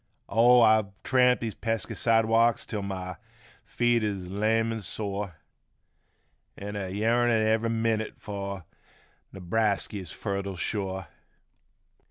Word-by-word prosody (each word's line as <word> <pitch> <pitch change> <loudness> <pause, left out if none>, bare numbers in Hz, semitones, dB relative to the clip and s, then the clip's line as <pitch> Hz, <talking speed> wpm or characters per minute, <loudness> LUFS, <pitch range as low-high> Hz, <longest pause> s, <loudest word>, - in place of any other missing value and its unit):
Oh 120 +2 +6
I've 110 -2 +5 0.2
tramped 125 -1 +3
these 115 -3 -3
pesky 115 -2 -3
sidewalks 115 0 +3
till 105 -3 -4
my 90 -2 -5 0.5
feet 120 -1 +1
is 95 -4 -3
lame 110 +3 +1
an' 110 - -5
sore, 100 -2 -4 1.2
An' 105 +1 -6
a 95 -2 -3
yearnin' 115 +3 +2
ever' 110 +1 +1
minute 115 -1 -1
fur 100 -2 -6 0.7
Newbrasky's 100 -1 -1
fertile 100 -2 -4
shore 95 -1 -3
110 Hz, 110 wpm, -27 LUFS, 100-115 Hz, 1.2 s, Oh